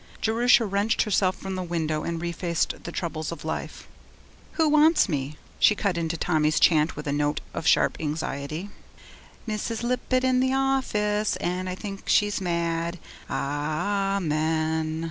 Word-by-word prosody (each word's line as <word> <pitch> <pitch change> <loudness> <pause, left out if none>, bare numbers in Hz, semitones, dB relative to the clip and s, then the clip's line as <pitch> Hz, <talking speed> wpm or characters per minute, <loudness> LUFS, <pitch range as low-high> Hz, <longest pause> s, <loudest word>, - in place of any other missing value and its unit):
Jerusha 235 +1 +4
wrenched 200 +3 +1
herself 190 -3 +1
from 190 0 -6
the 185 - -3
window 160 -3 -2
and 170 +1 -3
refaced 170 0 -2
the 170 - -4
troubles 160 -3 -3
of 170 - -8
life. - - -5 0.7
'Who 320 -1 +2
wants 305 0 +5
me?' 145 -3 -3 0.2
she 210 - +5
cut 200 -3 0
into 165 -1 -2
Tommy's 155 -2 +1
chant 155 -1 +4
with 150 - -7
a 140 - -1
note 145 +1 0
of 165 - -3
sharp - - +4
anxiety. 155 +3 -4 0.8
Mrs. 220 +2 -3
Lippett 250 +1 0
in 255 -1 +3
the 260 +1 +2
office, 215 -6 +1
And 180 +1 -2
I 180 - -3
think 195 0 -7
she's 205 -1 +3
mad. 170 -1 -1 0.3
Ah 175 +8 -1
a - - -2
men! 155 0 0
175 Hz, 155 wpm, -25 LUFS, 155-210 Hz, 0.8 s, wants